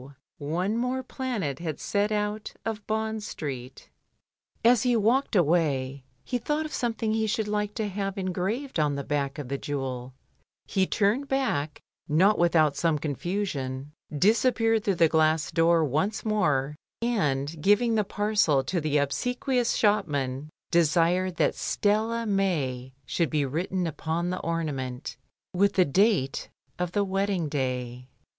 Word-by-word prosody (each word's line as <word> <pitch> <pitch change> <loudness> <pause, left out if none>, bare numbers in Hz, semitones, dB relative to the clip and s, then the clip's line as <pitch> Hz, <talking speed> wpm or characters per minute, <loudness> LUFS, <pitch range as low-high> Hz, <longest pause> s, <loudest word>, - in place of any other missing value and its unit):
one 175 +8 -1
more 250 +2 -1
planet 235 - -3
had 160 -3 -4
set 205 +1 0
out 210 0 -2
of 220 -2 -4
Bond 220 0 -1
Street. 135 -9 -6 0.8
As 240 -1 +6
he 245 0 +2
walked 230 +4 +2
away 145 -6 +1 0.2
he 245 - -2
thought 300 +6 -1
of 310 - -7
something 225 -2 -1
he 220 0 +1
should 215 0 -1
like 210 0 -1
to 220 -2 -1
have 195 0 -3
engraved 195 - -2
on 145 -2 +2
the 140 - -3
back 140 -1 -2
of 145 -4 -5
the 140 +1 -3
jewel, 130 -3 -4 0.5
he 190 -1 +1
turned 220 +8 +1
back, 225 - -1 0.3
not 190 +8 +4
without 160 -4 +3
some 165 -3 +1
confusion, 145 -3 -3 0.3
disappeared 225 - +3
through 200 -4 +1
the 170 -1 +5
glass 155 -1 +2
door 165 -1 +3
once 155 - -1
more, 150 -10 +1 0.3
and 150 - 0
giving 215 +6 +3
the 215 -1 +2
parcel 205 -9 +2
to 175 +5 -1
the 150 -1 +1
obsequious 245 - 0
shop 210 -3 +3
man 140 0 -3 0.2
desired 170 +2 +3
that - - +2
Stella 220 +3 0
mea 150 - -1
should 170 +3 0
be 150 -3 +1
written 175 +6 -2
upon 165 +2 -2
the 185 - -3
onlament 145 -6 -3 0.4
with 200 +2 +3
the 185 - +4
date 180 - +1 0.3
of 180 -1 -2
the 205 - +2
wedding 195 -3 0
day. 125 -3 -3
180 Hz, 145 wpm, -27 LUFS, 145-215 Hz, 0.8 s, As